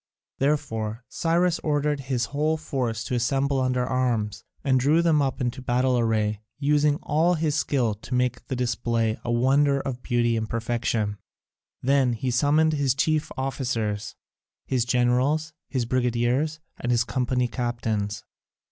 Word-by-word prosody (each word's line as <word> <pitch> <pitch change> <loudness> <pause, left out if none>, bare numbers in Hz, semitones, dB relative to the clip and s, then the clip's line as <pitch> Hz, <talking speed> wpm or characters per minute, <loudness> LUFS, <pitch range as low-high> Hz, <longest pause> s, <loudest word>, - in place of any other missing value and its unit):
Therefore 115 -5 -1
Cyrus 170 +1 +1
ordered 150 -1 0
his 130 -3 -1
whole 155 +2 +1
force 125 -7 -2
to 120 - -4
assemble 135 +3 +1
under 125 -1 +1
arms, 115 -5 -1 0.2
and 130 -2 +3
drew 150 +6 +3
them 160 -3 +3
up 135 -1 -1
into 125 0 -2
battle 125 +1 +1
array, 110 -3 +1 0.2
using 145 +1 +3
all 165 +4 +2
his 155 -2 0
skill 135 -6 +1
to 105 +4 -6
make 125 -1 -1
the 130 - -2
display 115 -2 0
a 120 - -2
wonder 140 +4 +3
of 130 -2 -4
beauty 120 -2 +1
and 110 -1 -2
perfection. 115 -3 -1 0.6
Then 135 -1 +3
he 125 +3 -2
summoned 150 +5 +3
his 140 -4 +1
chief 155 +2 0
officers, 115 -6 -2 0.5
his 125 -3 0
generals, 130 +6 +1 0.2
his 130 -4 -1
brigadiers, 125 +5 0 0.2
and 120 - -3
his 120 -1 +3
company 125 0 0
captains. 115 -4 -2
125 Hz, 145 wpm, -25 LUFS, 120-145 Hz, 0.6 s, and